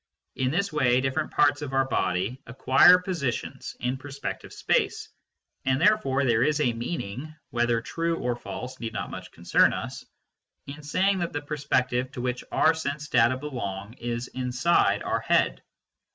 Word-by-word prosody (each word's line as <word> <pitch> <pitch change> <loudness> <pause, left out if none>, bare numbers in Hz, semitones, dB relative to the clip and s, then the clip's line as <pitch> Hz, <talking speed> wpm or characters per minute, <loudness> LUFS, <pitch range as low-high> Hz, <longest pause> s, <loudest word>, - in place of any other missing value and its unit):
In 130 -1 0
this 190 +5 -1
way 125 -4 +3
different 130 0 -1
parts 145 0 +3
of 140 -2 -5
our 135 0 +3
body 95 +4 -1
acquire 130 +8 +6
positions 170 - -4
in 125 +2 -1
perspective 140 +1 -6
space, - - 0 0.5
and 130 0 +1
therefore 165 -9 +3
there 115 -2 +3
is 150 +3 +2
a 125 -5 +2
meaning 125 +3 -5 0.2
(whether 120 -1 +1
true 165 +6 -2
or 125 -4 -1
false 125 +1 -7
need 115 -1 -5
not - - -4
much - - -8
concern - - +3
us) - - -5 0.6
in 145 +2 -8
saying 190 +6 +1
that 170 -1 -2
the 145 - -2
perspective 130 -4 -1
to 125 - -5
which 125 0 -2
our 160 - +4
sense 150 -1 -4
data 120 +1 +4
belong 110 -8 -5
is 120 +1 -3
inside 130 +6 +1
our - - 0
head. - - +1
130 Hz, 160 wpm, -26 LUFS, 120-150 Hz, 0.6 s, acquire